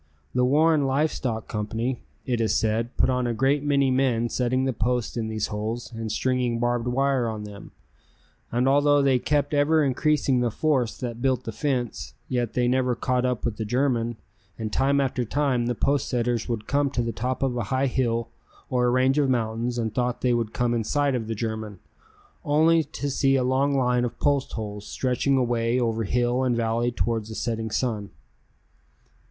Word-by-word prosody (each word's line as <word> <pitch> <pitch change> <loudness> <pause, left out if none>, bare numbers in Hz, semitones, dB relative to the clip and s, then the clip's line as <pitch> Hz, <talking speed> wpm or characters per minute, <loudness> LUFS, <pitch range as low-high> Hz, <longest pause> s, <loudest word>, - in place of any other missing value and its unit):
The 125 - +2
Warren 150 +2 +3
Live 145 +4 +1
Stock 115 -3 -3
Company, 115 +4 -3 0.2
it 120 -3 0
is 110 - +1
said, 115 +2 0
put - - +3
on 125 -1 0
a 120 - -1
great 135 +5 +2
many 140 -2 +2
men 125 -3 +1
setting 130 +2 0
the 130 - 0
posts 120 +1 -1
in 115 -2 -2
these 110 -1 -2
holes 110 +4 -4
and 115 -1 -4
stringing 125 +1 0
barbed 120 0 0
wire 135 -1 +1
on 110 -1 -5
them, 105 -1 -10 0.8
and 125 +2 +1
although 145 +1 +4
they 135 -2 +3
kept 145 +2 0
ever 150 +2 +3
increasing 140 -1 +2
the 120 -1 +1
force 130 -1 0
that 120 -2 -5
built 130 -1 +1
the 115 - -5
fence, 120 - -3
yet 120 -3 -1
they 125 -1 +1
never 125 0 +1
caught 125 +1 0
up 125 -3 -2
with 115 -3 -2
the 110 - -2
German, 120 0 0 0.4
and 110 -1 -4
time 140 +1 +2
after 130 -2 0
time 125 -1 0
the 120 - -1
post 140 +4 0
setters 120 -2 -1
would 110 -3 -3
come 140 0 +1
to 125 -3 -1
the 115 - -2
top 125 +4 -2
of 130 -2 0
a 120 -4 -2
high 130 +5 0
hill 115 -3 0 0.4
or 125 -1 +2
a - - +3
range 130 +3 +3
of 140 -2 +2
mountains 120 0 -1
and 110 -2 -2
thought 125 0 -1
they 125 -1 +2
would 115 -2 -1
come 120 0 0
in 115 -1 0
sight 145 +4 +1
of 115 -3 -2
the 115 - -3
German, 110 -2 -4 0.7
only 160 +2 +4
to 145 -1 -5
see 135 0 +2
a 130 - +2
long 135 +2 +1
line 125 -1 +2
of 120 - -3
post 140 -2 +1
holes 105 -2 -6
stretching 130 +1 0
away 120 -1 +1
over 115 -2 0
hill 120 +3 +1
and 125 -2 +1
valley 115 +1 +1
towards 115 -2 -2
the 110 - -7
setting 115 -1 -2
sun. 110 -3 -2
125 Hz, 195 wpm, -25 LUFS, 115-135 Hz, 0.8 s, although